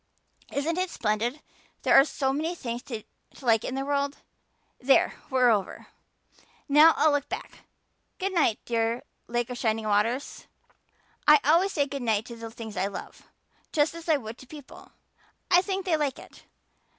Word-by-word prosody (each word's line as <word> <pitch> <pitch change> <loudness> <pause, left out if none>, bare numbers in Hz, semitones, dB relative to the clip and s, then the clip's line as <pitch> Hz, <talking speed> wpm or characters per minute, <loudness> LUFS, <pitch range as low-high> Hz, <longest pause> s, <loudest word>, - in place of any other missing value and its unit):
Isn't 320 +5 -1
it 370 0 -1
splendid 235 +3 -2 0.4
there - - +3
are 270 +1 +8
so 270 -3 -1
many 320 +5 -2
things 240 -6 -5
to 225 -4 -5 0.4
like 230 -4 +2
in 260 - -4
this 270 - -2
world? 280 0 -1 0.6
There 270 +1 +3 0.2
we're 255 -2 +4
over. 205 -4 -2 0.8
Now 300 +3 +7
I'll 310 - +4
look 290 -1 -1
back. 405 +6 -7 0.6
Good 385 0 -2
night, 300 - +2
dear 230 0 -1 0.2
Lake 240 +1 -2
of 245 - -5
Shining 220 -1 0
Waters. 215 +6 -1 0.8
I 300 0 +8
always 340 +7 +3
say 285 -3 +2
good 280 -1 -6
night 220 -2 0
to 235 - -9
the 230 0 -8
things 220 -3 -9
I 195 - +1
love, 200 - -9 0.4
just 295 +1 +2
as 335 0 -9
I 310 - +5
would 225 -3 -9
to 260 - -14
people. 290 -1 -13 0.6
I 355 0 +7
think 385 0 -3
they 350 -4 +2
like 290 -4 -1
it. - - -15
270 Hz, 170 wpm, -27 LUFS, 230-305 Hz, 0.8 s, are